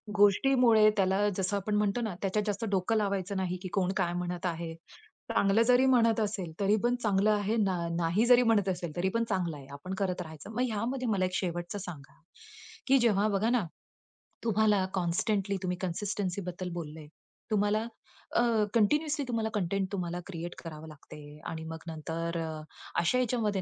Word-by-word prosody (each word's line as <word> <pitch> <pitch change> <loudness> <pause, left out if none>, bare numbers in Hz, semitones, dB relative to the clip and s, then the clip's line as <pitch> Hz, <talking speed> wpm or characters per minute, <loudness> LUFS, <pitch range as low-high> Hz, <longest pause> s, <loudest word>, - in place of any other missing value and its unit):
गोष्टीमुळे 220 +2 +5
त्याला 195 +2 +2
जसं 190 +2 0
आपण 205 +2 -2
म्हणतो 210 +3 +1
ना 215 -6 -3
त्याच्यात 200 +2 0
जास्त 205 +2 -1
डोकं 195 +3 +1
लावायचं 200 -1 -1
नाही 185 -1 -1
की 190 - -5
कोण 190 -2 +1
काय 175 0 +1
म्हणत 180 0 -3
आहे. 165 -1 -3 0.6
चांगलं 200 +3 +3
जरी 250 +1 +5
म्हणत 230 -4 +4
असेल 200 -5 -2
तरी 200 +1 +3
पण 245 +1 +3
चांगलं 205 0 +3
आहे, 210 +1 +1
न 205 -3 +2 0.3
नाही 175 +6 +2
जरी 245 0 +6
म्हणत 215 -5 +3
असेल 175 -3 -3
तरी 185 +2 +1
पण 230 - +2
चांगलं 180 -6 -1
आहे. 135 -2 -12
आपण 180 +7 -6
करत 185 -2 -1
राहायचं. 160 +4 -9
मग 235 +3 -2
ह्यामध्ये 250 +4 -2
मला 190 -3 +2
एक 185 - -4
शेवटचं 175 +1 -2
सांगा, 165 -7 -9 0.7
की 270 +1 +6
जेव्हा 215 -3 +3
बघा 210 +3 +1
ना, 240 -6 +2 0.8
तुम्हाला 210 -3 +3
कॉन्स्टंटली 195 +3 0
तुम्ही 180 -1 -1
कन्सिस्टन्सी 190 +1 -2
बद्दल 180 0 -5
बोललं 160 -2 -6
आहे. 150 -1 -12 0.4
तुम्हाला 210 +1 +2 0.5
अ, - - +5 0.3
कंटिन्युअसली 295 +7 +2
तुम्हाला 225 -2 -1
कंटेंट 195 -1 0
तुम्हाला 175 -3 -3
क्रिएट 175 -2 -6
करावं 160 -1 -8
लागतंय 150 0 -12
आणि 160 -1 -5
मग 160 0 -7
नंतर 165 +1 -4 0.6
अशा 170 +9 +2
ह्याच्यामध्ये 225 -6 0
195 Hz, 170 wpm, -30 LUFS, 175-215 Hz, 0.8 s, जरी